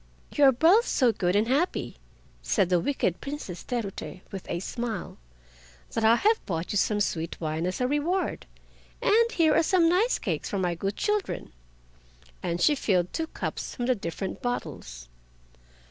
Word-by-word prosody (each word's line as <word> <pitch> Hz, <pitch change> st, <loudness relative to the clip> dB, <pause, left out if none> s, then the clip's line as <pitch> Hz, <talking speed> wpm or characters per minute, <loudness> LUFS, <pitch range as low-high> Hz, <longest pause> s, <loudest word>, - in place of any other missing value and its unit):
"You 290 Hz, -, +5 dB
are 270 Hz, -, +8 dB
both 340 Hz, -, +4 dB
so 250 Hz, -4 st, +3 dB
good 180 Hz, -3 st, 0 dB
and 210 Hz, +2 st, +3 dB
happy." 290 Hz, +8 st, 0 dB, 0.4 s
said 195 Hz, -5 st, +1 dB
the 180 Hz, -1 st, +3 dB
wicked 185 Hz, -, -1 dB
Princess 275 Hz, -, -6 dB
Terute 210 Hz, -6 st, -5 dB
with 195 Hz, -2 st, -7 dB
a 170 Hz, -, -1 dB
smile, 225 Hz, -, -5 dB, 0.7 s
"that 225 Hz, -, -1 dB
I 225 Hz, +1 st, +6 dB
have 435 Hz, -, +2 dB
brought 165 Hz, -3 st, -3 dB
you 205 Hz, -, 0 dB
some 210 Hz, +1 st, +1 dB
sweet 165 Hz, -5 st, -2 dB
wine 160 Hz, +1 st, -2 dB
as 185 Hz, -, -3 dB
a 250 Hz, -, +1 dB
reward—and 380 Hz, -, -1 dB
here 320 Hz, -3 st, +4 dB
are -, -, +5 dB
some 335 Hz, 0 st, +3 dB
nice 385 Hz, +9 st, +3 dB
cakes 170 Hz, -9 st, -3 dB
for 200 Hz, -, -2 dB
my 180 Hz, -2 st, 0 dB
good 195 Hz, +4 st, -3 dB
children." 415 Hz, -, -2 dB, 0.9 s
And 175 Hz, -1 st, -2 dB
she 295 Hz, -, +5 dB
filled 185 Hz, -10 st, 0 dB
two 325 Hz, -1 st, -2 dB
cups -, -, -5 dB
from 245 Hz, -, -2 dB
the 255 Hz, -, +3 dB
different 190 Hz, -2 st, -5 dB
bottles. 125 Hz, -, -5 dB
225 Hz, 165 wpm, -27 LUFS, -, 0.9 s, are